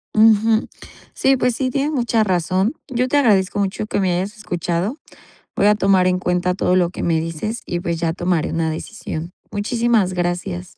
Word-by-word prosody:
Ujú. 220 +1 +4 0.5
Sí, 270 0 +2
pues, 250 -1 +1
sí, 260 0 -1
tienes 280 +4 -1
mucha 235 -5 +1
razón. 185 - 0
Yo 255 -1 0
te 290 - +1
agradezco 205 -8 +3
mucho 200 +1 -1
que - - -1
me 185 -2 +1
hayas 195 +5 -3
escuchado. 180 - -2 0.6
Voy 200 - +2
a 210 - +5
tomar 195 -2 +3
en 180 0 +1
cuenta 180 0 0
todo 180 -1 +1
lo 180 -2 +3
que - - -6
me 165 -2 +2
dices 165 +8 -4
y, 175 - -3
pues, 170 -2 -3
ya 165 -1 0
tomaré 175 -2 -1
una 165 -1 0
decisión. 170 -1 -6 0.2
Muchísimas 220 -2 +1
gracias. 180 +1 -3
190 Hz, 185 wpm, -20 LUFS, 175-225 Hz, 0.6 s, a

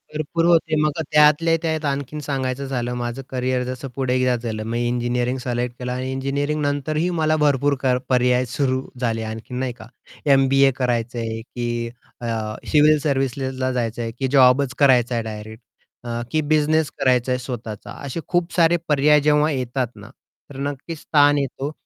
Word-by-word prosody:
भरपूर 165 +2 -1
होते, 165 -2 +3
मग 150 - +2 0.2
त्यातल्या 150 +2 +5
त्यात 160 -2 -1
आणखीन 140 +1 -3
सांगायचं 135 -1 -2
झालं 125 -2 -2
माझं 120 +2 -4
कॅरियर 130 0 -1
जसं 130 +2 -5
पुढे 130 -2 0
एकदा 130 -1 +2
झालं, 115 -2 -4
मी 115 +2 -2
इंजिनिअरिंग 120 +1 -1
सिलेक्ट 120 -1 -2
केलं 125 0 -4
आणि 130 +1 -3
इंजिनिअरिंग 140 +3 -1
नंतरही 150 +4 0
मला 155 0 +2
भरपूर 145 -1 +2
क 130 -1 +3
पर्याय 125 0 +3
सुरू 130 -2 0 0.2
झाले 115 -2 -1
आणखीन 110 +3 -6
नाही 130 -2 -2
का. 120 - -13 0.4
एम-बी-ए 135 -1 +5
करायचं 120 -2 -1
आहे 115 -1 -4
की 120 0 -4 0.3
अ, - - -5 0.5
सिविल 150 0 +5
सर्व्हिसेसला 135 -2 -1
जायचं 120 -2 -2
आहे, 115 - -3
की 130 +4 -3
जॉबच 130 0 +4
करायचा 125 -3 +4
आहे 115 - -1
डायरेक्ट. 110 +1 -8 0.4
अ, 120 -1 -3
की 155 - +2
बिझनेस 155 0 +2
करायचा 125 -1 +2
आहे 125 - 0
स्वतःचा 120 -4 -7
असे 140 +4 -4
खूप 175 -1 0
सारे 170 0 +4
पर्याय 150 0 +4
जेव्हा 150 +1 +3
येतात 125 -1 -1
ना, - - -12 0.4
तर 135 - -10
नक्कीच 145 +3 -7
स्थान 145 -1 +4
येतो 140 +1 -3
130 Hz, 165 wpm, -22 LUFS, 120-145 Hz, 0.5 s, त्यातल्या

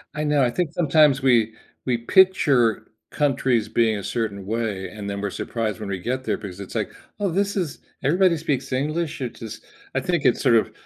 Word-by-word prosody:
I 150 - -2
know, 150 -2 +3
I 120 - +3
think 170 +2 -1
sometimes 150 -4 +4
we 115 -4 +3 0.3
we 125 -2 +1
picture 130 - +3 0.2
countries 130 -6 +1
being 110 -2 +2
a 100 - -6
certain 100 -5 -3
way, 105 -4 -2
and 100 0 -7
then 100 0 -4
we're 100 - -1
surprised 110 -3 -3
when 105 -2 -5
we 95 -2 -3
get 130 +6 -3
there - - -1
because 95 -2 -8
it's 100 - -8
like, - - -1 0.3
"Oh, 200 -2 0
this 200 +4 0
is 170 -7 -2 0.2
everybody 170 +3 +3
speaks 140 -4 -2
English, 150 +3 -2
it 125 - -4
just," 110 -2 -9 0.3
I - - +3
think 175 -5 -1
it's - - +3
sort 125 -4 +4
of 110 - +2
125 Hz, 205 wpm, -23 LUFS, 110-150 Hz, 0.3 s, sometimes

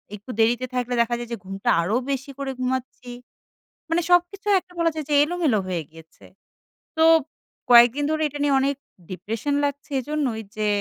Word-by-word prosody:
একটু 210 +5 -10
দেরিতে 240 +3 +2
থাকলে 245 0 -1
দেখা 240 +1 0
যায় 240 0 -7
যে - - -3
ঘুমটা 195 +1 -4
আরও 200 +7 -1 0.2
বেশি 270 +1 -4
করে 275 -1 -3
ঘুমাচ্ছি। 255 -1 -4 0.8
মানে 340 +1 +2
সবকিছু 355 +3 +2
একটা 360 - -23
বলা 335 -1 +2
যায় 310 -3 -5
যে - - +2
এলোমেলো 320 -9 0
হয়ে 175 -3 -2
গিয়েছে। 160 0 -17 0.7
তো 320 - +5 0.7
কয়েকদিন 240 +4 +7
ধরে 315 0 -1
এটা 290 +1 -8
নিয়ে 280 -2 +3
অনেক 280 +1 0 0.4
depression 225 +9 -3
লাগছে 285 +1 -5
এইজন্যই 270 -5 -2 0.2
যে 215 0 0
260 Hz, 165 wpm, -23 LUFS, 230-295 Hz, 0.8 s, কয়েকদিন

